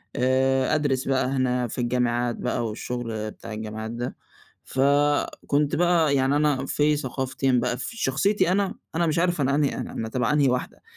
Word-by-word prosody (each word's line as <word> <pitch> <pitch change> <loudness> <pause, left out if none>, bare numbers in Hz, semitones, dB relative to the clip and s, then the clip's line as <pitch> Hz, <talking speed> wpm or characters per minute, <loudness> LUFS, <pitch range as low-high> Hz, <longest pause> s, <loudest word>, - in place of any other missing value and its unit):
آآ، 130 +1 +2
أدرس 135 -4 0
بقى 135 -1 +2
هنا 125 -2 0
في 125 - -4
الجامعات 120 -1 0
بقى 125 -1 -2
والشغل 110 -1 -4
بتاع 115 - -9
الجامعات 110 +1 -5
ده، 120 +1 -4 0.5
فكنت 145 +1 +1
بقى 170 -4 +3
يعني 135 +1 +2
أنا 145 -3 +1
في 150 +2 +2
ثقافتين 130 -1 0
بقى 125 0 -1
في 230 - -5
شخصيتي 185 - +1
أنا، 195 0 +1 0.2
أنا 170 +1 +2
مش 155 +1 +1
عارف 175 -3 +1
أنا 140 +1 +2
أنهي 145 -1 +1
أنا 125 - -5
أنا 110 - -4
تبع 125 +3 0
أنهي 145 -3 +3
واحدة 125 0 -3
130 Hz, 170 wpm, -25 LUFS, 125-145 Hz, 0.5 s, بقى